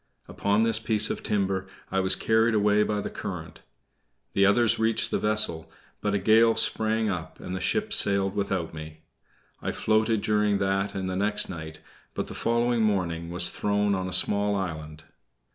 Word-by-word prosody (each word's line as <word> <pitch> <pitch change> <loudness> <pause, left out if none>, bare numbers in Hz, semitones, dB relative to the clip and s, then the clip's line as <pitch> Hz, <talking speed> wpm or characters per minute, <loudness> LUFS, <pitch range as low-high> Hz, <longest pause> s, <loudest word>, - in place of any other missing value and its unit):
Upon 100 +2 0
this 115 -1 +3
piece 110 -1 +1
of - - -5
timber 95 -2 -1 0.2
I 95 - +1
was 95 0 +2
carried 110 +1 +2
away 105 0 +3
by 105 -1 0
the - - -5
current. - - -7 0.7
The 100 0 +4
others 110 +3 +3
reached 110 0 0
the - - 0
vessel, 105 -7 0 0.3
but 105 -1 0
a - - +3
gale 110 +3 +4
sprang 110 -1 0
up 85 -4 -6
and 90 - -6
the - - -3
ship 215 - 0
sailed 100 -1 +3
without 95 -5 -2
me. 80 0 -9 0.6
I - - -2
floated 110 0 +1
during 105 -1 +1
that 95 +1 -1
and 95 -1 -3
the 95 - -3
next 105 +2 +1
night, 80 -3 -8 0.3
but - - -2
the - - -8
following 120 0 0
morning 85 -6 -1
was 90 +1 0
thrown 105 0 0
on 95 -1 -2
a - - -6
small 100 0 +2
island. 80 -5 -5
100 Hz, 180 wpm, -26 LUFS, 95-110 Hz, 0.7 s, The